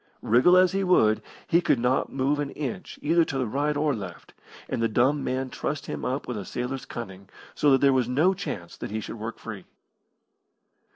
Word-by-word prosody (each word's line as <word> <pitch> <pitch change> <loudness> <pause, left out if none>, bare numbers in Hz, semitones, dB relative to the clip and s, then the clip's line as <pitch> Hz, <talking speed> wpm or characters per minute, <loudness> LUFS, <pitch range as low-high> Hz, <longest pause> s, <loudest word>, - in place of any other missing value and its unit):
Wriggle 125 +11 +5
as 185 -1 +5
he 195 0 0
would 110 - +4 0.2
he 170 - +3
could 140 - +2
not 125 +2 +1
move 140 +2 0
an 145 -1 -2
inch 140 -4 -5
either 165 +3 +4
to 135 - -3
the 130 - 0
right 145 +6 -1
or 150 0 +1
left, 95 -7 -8 0.3
and - - -2
the 115 - +3
dumb 130 +6 +2
man 130 0 -2
trussed 150 +1 -3
him - - -5
up 130 +3 -2
with 125 - -3
a 100 - -4
sailor's 125 +5 -4
cunning, 95 -4 -8 0.2
so 150 - +2
that 135 -1 +4
there 140 -1 +5
was 125 -2 +1
no 155 +9 +3
chance 90 - -6
that - - -6
he 110 +2 -3
should 110 - -7
work 115 +2 -5
free. 105 -5 -8
130 Hz, 210 wpm, -26 LUFS, 115-150 Hz, 0.3 s, Wriggle